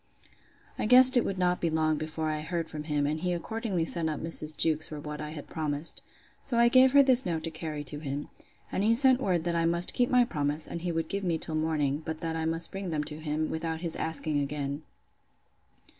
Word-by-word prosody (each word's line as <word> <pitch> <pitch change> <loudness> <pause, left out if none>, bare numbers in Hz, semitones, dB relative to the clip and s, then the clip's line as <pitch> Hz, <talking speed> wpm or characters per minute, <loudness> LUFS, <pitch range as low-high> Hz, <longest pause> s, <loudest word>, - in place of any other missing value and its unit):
I - - 0
guessed 255 +2 +8
it 245 - +4
would 195 - -3
not 180 -1 +1
be 170 - +1
long 155 -1 +1
before 155 0 -3
I 155 -1 -2
heard 165 +1 -3
from 150 -1 -6
him 150 -2 0
and 150 +2 -1
he 180 +1 -1
accordingly 190 -1 -2
sent 165 -1 +1
up 155 - -3
Mrs. 155 -1 0
Jewkes 160 -1 +1
for 150 - -7
what 150 0 -6
I 150 - -5
had 150 -2 -8
promised. 150 0 -2 0.4
So 245 -4 -2
I 235 0 +6
gave 255 +1 +6
her 280 0 +8
this 260 -1 +4
note 165 -5 -2
to 165 - -4
carry 155 -2 -5
to 145 +1 -7
him. 145 -1 -5 0.4
And 195 - -1
he 225 +2 +4
sent 260 0 +4
word, 180 -8 0
that 170 0 -1
I 165 0 +1
must 170 +1 +1
keep 245 -1 +1
my 250 -1 +4
promise, 150 -4 -1
and 170 - -6
he 175 0 -2
would 165 -1 -2
give 200 +3 -3
me 170 -3 0
till 160 - -5
morning; 155 -2 0
but 160 0 -5
that 165 -1 -3
I 160 0 -2
must 165 +1 -2
bring 195 -1 -5
them 155 -2 -1
to 150 +1 -6
him, 155 0 -2
without 160 0 -3
his 170 -2 -3
asking 155 -2 -1
again. 140 0 -3
160 Hz, 235 wpm, -29 LUFS, 155-180 Hz, 0.4 s, guessed